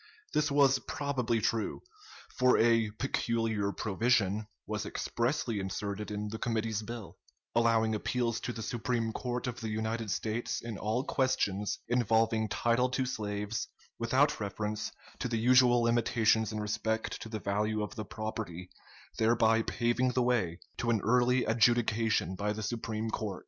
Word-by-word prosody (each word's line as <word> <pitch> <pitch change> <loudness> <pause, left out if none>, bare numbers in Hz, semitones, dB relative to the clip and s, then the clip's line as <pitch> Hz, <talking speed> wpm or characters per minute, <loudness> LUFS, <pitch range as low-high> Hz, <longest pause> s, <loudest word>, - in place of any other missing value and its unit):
This 150 0 +2
was 140 -2 +4
probably 135 -7 -1
true; 110 +1 -1 0.5
for 125 0 +4
a 115 -1 +4
"peculiar 115 -5 0
provision" 105 -1 +1 0.2
was - - -3
expressly 120 -2 -1
inserted 100 +2 -4
in 105 0 -3
the 110 +1 -5
committee's 110 -2 -1
bill, 115 -1 -8 0.3
allowing 115 -1 +3
appeals 115 +2 -1
to 120 - -3
the 115 -2 -6
Supreme 115 0 -1
Court 125 +1 -3
of 125 -2 -4
the 110 - -3
United 110 +1 -2
States 110 +4 -2
in 115 -2 -6
all 110 +5 0
questions 105 -8 0
involving 115 -2 +2
title 120 +4 +2
to 130 +1 0
slaves, 105 -1 -3 0.3
without 130 +6 +2
reference 105 +1 -3 0.3
to 125 - -1
the 115 -1 -1
usual 120 +1 +5
limitations 115 -2 +2
in 110 - -3
respect 110 +1 -2
to 115 - -7
the 110 - -3
value 105 +2 0
of 105 - -5
the 110 - -5
property, 105 -5 -5 0.5
thereby 115 0 +4
paving 120 +2 0
the 125 - +2
way 110 -9 +1 0.2
to 120 - -1
an 115 -2 +3
early 125 +2 +3
adjudication 110 -4 +2
by 105 +2 -1
the 110 0 -5
Supreme 110 0 -3
Court. 105 -4 -3
115 Hz, 150 wpm, -31 LUFS, 105-120 Hz, 0.5 s, usual